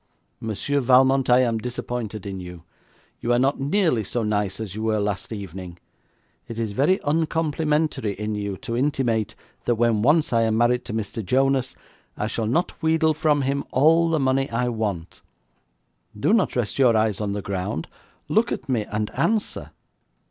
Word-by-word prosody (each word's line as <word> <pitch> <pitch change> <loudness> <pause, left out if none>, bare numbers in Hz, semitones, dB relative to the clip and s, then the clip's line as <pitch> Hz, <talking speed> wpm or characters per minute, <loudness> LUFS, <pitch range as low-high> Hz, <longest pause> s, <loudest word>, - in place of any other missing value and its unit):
'Monsieur 115 +6 -1
Valmont, 130 +1 +4
I 125 +1 +6
am 115 -3 +1
disappointed 120 -3 -5
in 95 -1 -5
you. 90 -2 -9 0.6
You 120 - -1
are - - +4
not 135 +3 +1
nearly 145 - +1
so 115 +4 -2
nice 105 -2 -1
as 105 -4 -5
you 110 - -5
were 110 -1 +1
last 100 0 -2
evening. 95 -4 -7 0.7
It 115 - -7
is 115 -2 -2
very 145 - +2
uncomplimentary 155 -5 0
in 105 +2 -4
you 100 -2 -3
to 115 - -2
intimate 120 -5 0 0.3
that 120 - +2
when 115 -2 +2
once 150 +3 +3
I 115 - +4
am 110 -1 +1
married 120 +1 +2
to - - -6
Mr. 110 0 -3
Jonas 130 +4 +1 0.4
I - - -1
shall 110 0 -2
not 165 +11 -1
wheedle 160 0 +3
from 150 -2 +1
him 140 +1 -1
all 165 +5 +4
the 160 -1 +1
money 135 0 +1
I 125 +2 0
want. 105 -7 -4 1.0
Do 200 - +2
not 225 -5 +2
rest 120 +1 -2
your 120 -4 +5
eyes 110 -2 +1
on 100 -1 -1
the 100 -1 -4
ground; 95 -3 -3 0.4
look - - +2
at - - -4
me 120 -5 0
and 105 0 -3
answer!' 220 -1 -1
120 Hz, 175 wpm, -23 LUFS, 105-140 Hz, 1.0 s, I